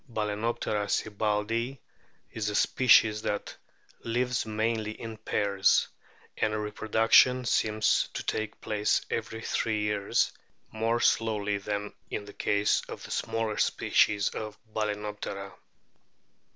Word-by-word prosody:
Balccnoptera 105 -1 -1
sibbaldii 110 +5 -1 0.5
is 105 -2 -2
a 105 - -3
species 110 -4 +4
that 105 - -3 0.4
lives 125 +1 -1
mainly 110 0 -1
in 115 -1 -6
pairs, 100 -2 +2 0.5
and 110 0 +1
reproduction 110 +4 +3
seems 110 -1 +2
to - - -3
take 110 0 -3
place 105 -1 0
every 110 0 -3
three 110 -2 0
years, 105 -1 +1 0.4
more 115 +2 0
slowly 105 -3 +1
than 105 0 -4 0.2
in 105 - -4
the 100 - -11
case 100 0 +1
of - - -7
the - - -9
smaller 110 -2 -2
species 100 -1 +2
of 110 -1 -6 0.2
Balccnoptera. 105 -2 -4
110 Hz, 110 wpm, -28 LUFS, 105-115 Hz, 0.5 s, species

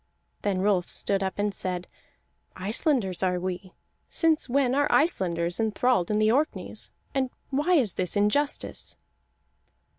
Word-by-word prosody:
Then 195 -2 0
Rolf 195 -4 +2
stood 195 -1 0
up 190 -1 -2
and 205 0 0
said: 180 -2 -2 0.7
"Icelanders 210 - 0
are 180 -1 +1
we. 185 +1 -4 0.4
Since 325 -4 +2
when 260 -1 +2
are 290 +2 +2
Icelanders 175 - +1
enthralled 220 -3 +1
in 210 - +1
the 215 0 +3
Orkneys, 290 +6 -1 0.2
and 265 -2 0 0.2
why 300 +7 +2
is 235 - +2
this 180 -2 -2
injustice?" 210 +9 0
210 Hz, 130 wpm, -26 LUFS, 185-270 Hz, 0.7 s, the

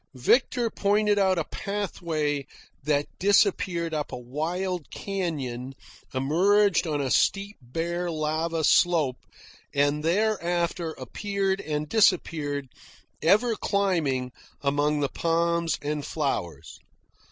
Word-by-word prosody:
Victor 235 - +2
pointed 205 0 +2
out 190 -2 +3
a 165 - +1
pathway 160 -9 -3 0.3
that 145 -1 +1
disappeared 185 -4 +2
up 150 -1 -2
a - - -4
wild 165 +7 -3
canyon, 135 -10 -4 0.4
emerged 180 +8 +3
on 150 -2 -1
a 135 -2 -2
steep 200 +1 +1
bare 170 +7 -3
lava 160 +1 -1
slope, 155 -6 +3 0.6
and 145 +1 +2
thereafter 175 -3 0
appeared 195 - -2
and 150 0 -3
disappeared, 150 -8 +1 0.5
ever 215 +8 +3
climbing, 165 -13 0 0.3
among 145 +1 +1
the 140 - +2
palms 170 -1 0
and 150 0 -2
flowers. 140 - -3
165 Hz, 105 wpm, -26 LUFS, 145-195 Hz, 0.6 s, out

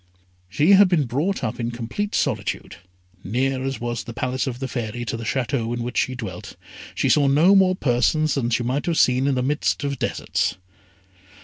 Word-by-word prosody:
She 150 - +3
had 200 -1 +7
been 170 -5 +2
brought 145 +9 -2
up 110 0 -3
in 120 0 -2
complete 120 - -4
solitude. 105 -9 -2 0.5
Near 130 +5 -1
as 135 0 -3
was 120 0 -3
the 120 - -9
Palace 130 +3 -2
of 125 -2 -3
the 135 +1 -4
Fairy 120 -1 -4
to 115 - -3
the 115 - -6
Château 120 -1 -1
in 120 - -3
which 125 +1 -2
she 130 - -1
dwelt, 120 -3 -7 0.4
she - - 0
saw 145 -2 +4
no 155 +8 +5
more 190 -2 +4
persons 150 +2 +1
than 125 -4 -1
she 120 0 0
might 130 +6 -2
have 170 -2 0
seen 130 +2 +3
in 140 - +1
the 125 - 0
midst 145 +1 0
of 140 -1 -3
deserts. 90 +2 -1
130 Hz, 200 wpm, -22 LUFS, 120-145 Hz, 0.5 s, had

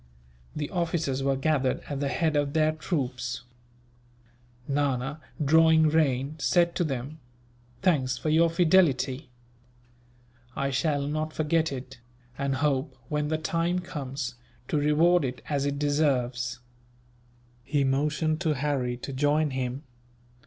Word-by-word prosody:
The 150 -1 -3
officers 165 -6 -1
were 135 0 +1
gathered 135 -1 +1
at 140 -2 -4
the 140 - 0
head 155 +2 0
of 145 -1 +1
their 155 -1 +3
troops. 135 -7 -3 1.2
Nana, 140 +1 -1 0.2
drawing 160 +1 +5
rein, 145 -2 +1
said 170 +1 +3
to - - +2
them: 140 +1 -4 0.6
"Thanks 140 -8 +2
for 155 - -2
your 165 +2 +4
fidelity. 160 -6 +2 1.3
I 140 0 -1
shall 145 0 0
not 155 +2 -2
forget 160 0 +1
it; 130 -2 -7 0.4
and 140 0 -1
hope, 135 -1 0
when 150 0 0
the 155 +1 0
time 165 +3 0
comes, 140 -6 -4 0.4
to - - +1
reward 155 +4 +4
it 125 -2 -4
as 140 -1 0
it 140 0 -2
deserves." 130 -5 0 1.1
He 140 +2 +1
motioned 150 +4 0
to 160 -4 +1
Harry 130 -3 -1
to 135 +3 -7
join 145 +2 +2
him. 130 +1 -3
145 Hz, 130 wpm, -27 LUFS, 135-155 Hz, 1.3 s, drawing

